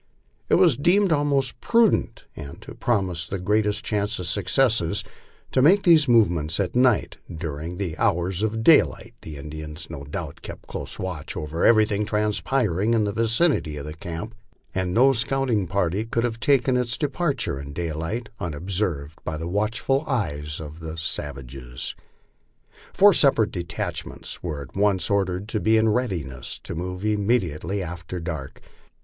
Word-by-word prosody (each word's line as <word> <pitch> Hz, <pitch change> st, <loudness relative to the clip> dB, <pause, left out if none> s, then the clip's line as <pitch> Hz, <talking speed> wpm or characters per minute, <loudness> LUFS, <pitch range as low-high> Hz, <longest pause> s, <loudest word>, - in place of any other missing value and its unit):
It -, -, +5 dB
was -, -, +5 dB
deemed 185 Hz, +6 st, +3 dB
most 140 Hz, -5 st, +1 dB
prudent, 230 Hz, -3 st, +2 dB
and 70 Hz, -, -8 dB
to -, -, -9 dB
promise 95 Hz, -7 st, -1 dB
greatest 105 Hz, +1 st, +1 dB
chance 105 Hz, +1 st, 0 dB
of 90 Hz, -, -4 dB
success, 115 Hz, -1 st, +2 dB, 0.5 s
to 130 Hz, -, +3 dB
make 185 Hz, +9 st, +5 dB
these 160 Hz, -4 st, +6 dB
movements 85 Hz, -9 st, +3 dB
at 95 Hz, 0 st, -1 dB
night, 125 Hz, -3 st, +3 dB
as 85 Hz, -, -7 dB
during 80 Hz, +1 st, -5 dB
the 90 Hz, -5 st, -3 dB
hours 90 Hz, +3 st, +1 dB
of 110 Hz, +1 st, -1 dB
daylight -, -, +4 dB
the 75 Hz, -2 st, -8 dB
Indians 75 Hz, +2 st, -8 dB
no 70 Hz, -3 st, -7 dB
doubt 75 Hz, +1 st, -6 dB
kept -, -, -9 dB
close -, -, -6 dB
watch 90 Hz, -6 st, -4 dB
over 75 Hz, +2 st, -3 dB
everything 105 Hz, -2 st, +4 dB
transpiring 105 Hz, -1 st, +1 dB
in 110 Hz, -, +2 dB
the 105 Hz, -, 0 dB
vicinity 115 Hz, -, +1 dB
of 75 Hz, +2 st, -7 dB
camp, 85 Hz, +8 st, -6 dB, 0.4 s
and 95 Hz, -1 st, -1 dB
no 130 Hz, +7 st, +5 dB
scouting 125 Hz, -5 st, 0 dB
party 95 Hz, +2 st, 0 dB
could 115 Hz, +1 st, -1 dB
have 115 Hz, -2 st, -2 dB
taken 130 Hz, 0 st, +3 dB
its 120 Hz, -1 st, 0 dB
departure 140 Hz, -, -1 dB
in 70 Hz, 0 st, -7 dB
daylight 85 Hz, +8 st, -3 dB
unobserved 85 Hz, -3 st, -2 dB
by 80 Hz, -, -3 dB
the 80 Hz, +2 st, -4 dB
watchful 110 Hz, -, 0 dB
eyes 75 Hz, -, -2 dB
of 80 Hz, 0 st, -8 dB
the 80 Hz, 0 st, -7 dB
savages. 70 Hz, -6 st, -4 dB, 1.0 s
Four 205 Hz, 0 st, +6 dB
separate 135 Hz, -9 st, +3 dB
detachments 85 Hz, -2 st, -5 dB
were 75 Hz, -5 st, -4 dB
at 65 Hz, -, -15 dB
once 100 Hz, -1 st, +2 dB
ordered 95 Hz, -1 st, 0 dB
to 110 Hz, -, 0 dB
be 110 Hz, +2 st, +3 dB
in 110 Hz, 0 st, +3 dB
readiness 95 Hz, -, -2 dB
to -, -, -5 dB
move 90 Hz, +3 st, -5 dB
immediately 100 Hz, -4 st, 0 dB
after 85 Hz, +1 st, -6 dB
dark. 80 Hz, -5 st, -6 dB
100 Hz, 155 wpm, -24 LUFS, 80-115 Hz, 1.0 s, these